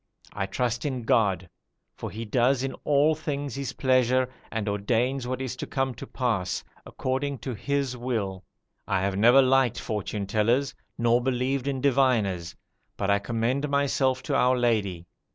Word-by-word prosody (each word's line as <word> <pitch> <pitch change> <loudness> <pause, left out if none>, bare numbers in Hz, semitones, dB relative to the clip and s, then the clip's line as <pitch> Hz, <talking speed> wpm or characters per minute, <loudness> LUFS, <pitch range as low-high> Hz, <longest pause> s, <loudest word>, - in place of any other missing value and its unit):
I 95 - -2
trust 120 +3 -1
in 130 -4 -2
God, 95 -5 +2 0.5
for - - -6
He 115 +2 -6
does 125 +4 +2
in 135 - -2
all 150 +2 +4
things 145 -3 -4
His 135 -1 -4
pleasure, 130 -1 +2 0.2
and 110 -2 -2
ordains 120 +6 0
what 130 0 -2
is 130 -1 -4
to - - -5
come 135 -1 -1
to - - -9
pass, 100 -8 -1 0.2
according 135 +2 -2
to 130 - -2
His 140 +3 -1
will. 110 -7 -3 0.4
I 95 -1 +1
have 95 0 0
never 120 +7 +6
liked 130 -2 +3
fortune 105 -1 -3
tellers, 115 +7 +1 0.2
nor 120 +1 +3
believed 130 +1 -1
in 135 -2 -1
diviners; 120 -11 +2 0.4
but 100 - 0
I 100 - +3
commend 120 +7 -1
myself 135 -2 +1
to 145 - -1
our 125 -1 +3
Lady. 105 -8 0
125 Hz, 160 wpm, -26 LUFS, 110-135 Hz, 0.5 s, never